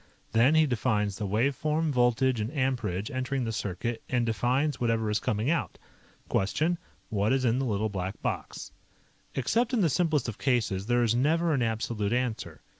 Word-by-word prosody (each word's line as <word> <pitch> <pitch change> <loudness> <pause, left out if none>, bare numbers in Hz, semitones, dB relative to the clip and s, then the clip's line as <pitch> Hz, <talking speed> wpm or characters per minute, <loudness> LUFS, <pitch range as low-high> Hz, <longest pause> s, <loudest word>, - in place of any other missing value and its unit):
Then 125 +7 +4
he 160 0 +5
defines 110 -6 0
the 105 - -2
wave 115 +8 +1
form, 155 +2 0
voltage, 125 -1 +2
and 110 +3 -2
amperage 115 -7 -1
entering 130 0 -2
the 115 - -2
circuit 105 +2 -3
and 120 -2 +1
defines 125 +5 0
whatever 115 -2 +1
is 105 - +1
coming 110 +7 0
out. 170 - -1 0.5
Question: 155 - 0 0.3
What 105 +1 +1
is 130 -1 +2
in 120 +2 +2
the 135 - 0
Little 110 -2 0
Black 95 0 -4
Box? - - -4 0.6
Except 225 - +1
in 235 - +3
the 170 - +3
simplest 155 -5 +1
of 115 - -5
cases, 110 -7 0
there 120 0 +3
is 115 -1 +2
never 160 +6 +2
an 135 - +1
absolute 110 -2 -1
answer. 125 -2 -2
120 Hz, 180 wpm, -28 LUFS, 110-135 Hz, 0.6 s, he